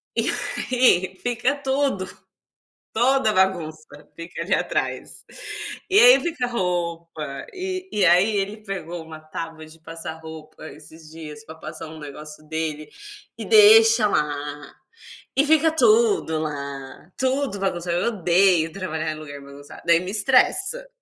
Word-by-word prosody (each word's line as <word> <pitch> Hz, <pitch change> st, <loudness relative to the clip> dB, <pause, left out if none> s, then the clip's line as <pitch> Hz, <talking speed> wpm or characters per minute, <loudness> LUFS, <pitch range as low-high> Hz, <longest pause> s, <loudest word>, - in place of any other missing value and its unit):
e -, -, 0 dB, 0.4 s
aí 190 Hz, -7 st, +3 dB
fica 245 Hz, +3 st, 0 dB
tudo 270 Hz, -7 st, -1 dB, 0.9 s
toda 245 Hz, 0 st, +3 dB
a -, -, 0 dB
bagunça 170 Hz, -5 st, 0 dB, 0.3 s
fica 170 Hz, 0 st, -7 dB
ali 175 Hz, -, -5 dB
atrás, -, -, -3 dB, 0.7 s
e 390 Hz, -, +5 dB
aí -, -, +8 dB
fica 290 Hz, -8 st, -2 dB
roupa, 170 Hz, -, -3 dB
e 370 Hz, 0 st, -5 dB
e 205 Hz, -, +1 dB
aí 180 Hz, +5 st, +4 dB
ele 200 Hz, +2 st, -2 dB
pegou 175 Hz, -4 st, -6 dB
uma 160 Hz, -1 st, -10 dB
tábua 160 Hz, 0 st, -7 dB
de 155 Hz, +1 st, -17 dB
passar 165 Hz, -1 st, -8 dB
roupa 160 Hz, -1 st, -11 dB
esses 155 Hz, +1 st, -15 dB
dias 150 Hz, -2 st, -10 dB
pra 160 Hz, -, -10 dB
passar 160 Hz, 0 st, -9 dB
um 160 Hz, -, -10 dB
negócio 150 Hz, +1 st, -10 dB
dele 155 Hz, -1 st, -4 dB, 0.5 s
e -, -, -6 dB
deixa 445 Hz, -, +7 dB
lá, 145 Hz, -3 st, -3 dB, 0.6 s
e 275 Hz, -, +4 dB
fica 315 Hz, +1 st, +4 dB
tudo 405 Hz, -, +3 dB
lá, 140 Hz, +1 st, -7 dB
tudo 260 Hz, -3 st, -1 dB
bagunçado, 175 Hz, -3 st, -2 dB
eu 180 Hz, -, -1 dB
odeio 180 Hz, -5 st, +2 dB
trabalhar 160 Hz, -4 st, -3 dB
em 155 Hz, -, -7 dB
lugar 145 Hz, -2 st, -9 dB
bagunçado, 140 Hz, +1 st, -13 dB
daí 170 Hz, 0 st, +5 dB
me 180 Hz, +1 st, -5 dB
estressa, 375 Hz, -, +2 dB
175 Hz, 140 wpm, -23 LUFS, 155-245 Hz, 0.9 s, aí